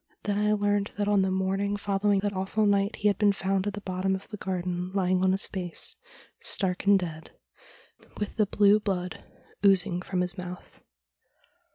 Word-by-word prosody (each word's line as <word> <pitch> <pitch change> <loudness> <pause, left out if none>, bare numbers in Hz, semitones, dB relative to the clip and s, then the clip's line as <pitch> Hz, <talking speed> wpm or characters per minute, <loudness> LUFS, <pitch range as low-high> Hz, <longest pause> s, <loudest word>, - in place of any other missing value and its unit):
Then 205 0 0
I 210 0 +2
learned 205 -1 +1
that 205 -1 0
on 205 -1 +3
the 190 - +1
morning 195 +2 0
following 200 0 +1
that 205 0 -1
awful 190 +3 0
night 200 0 +2
he 210 - 0
had 200 -2 +1
been 205 -2 +4
found 195 0 -1
at 205 - -2
the 205 - -6
bottom 190 0 -1
of 190 - -8
the 210 - -7
garden 180 -1 -3
lying 185 -1 +1
on 190 - +4
his 190 +1 +1
face, 180 -3 -3 0.4
stark 185 -2 -1
and 200 0 +7
dead, 165 -4 -6 0.9
with 210 - -4
the 215 -2 +3
blue 205 +1 +4
blood 185 -4 -3 0.4
oozing 185 -3 +4
from 180 0 -2
his 180 0 -3
mouth. 180 0 -9
195 Hz, 185 wpm, -27 LUFS, 185-205 Hz, 0.9 s, and